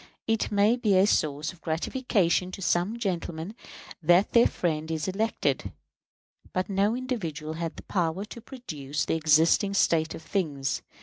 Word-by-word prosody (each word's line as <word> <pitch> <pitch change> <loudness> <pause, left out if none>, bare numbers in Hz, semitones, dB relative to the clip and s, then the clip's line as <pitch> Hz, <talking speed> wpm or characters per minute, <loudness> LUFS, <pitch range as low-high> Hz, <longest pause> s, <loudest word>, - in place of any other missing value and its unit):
It 225 -1 0
may 210 +4 +4
be 210 -6 +3
a 190 - +6
source 155 -4 0
of 170 - -20
gratification 180 +1 0
to 195 - -7
some 180 +7 +1
gentlemen 175 -3 -3 0.5
that 175 +5 +4
their 235 0 +6
friend 160 -2 -2
is 160 0 -2
elected; 215 +4 -1 0.8
but 185 0 -1
no 200 +3 +2
individual 170 - -4
had 165 0 -4
the - - -10
power 180 +1 -1
to 235 +2 -10
produce 155 - -5
the - - 0
existing 160 +6 +3
state 165 -4 +2
of 160 - -10
things. 150 -7 -1
180 Hz, 150 wpm, -27 LUFS, 160-210 Hz, 0.8 s, a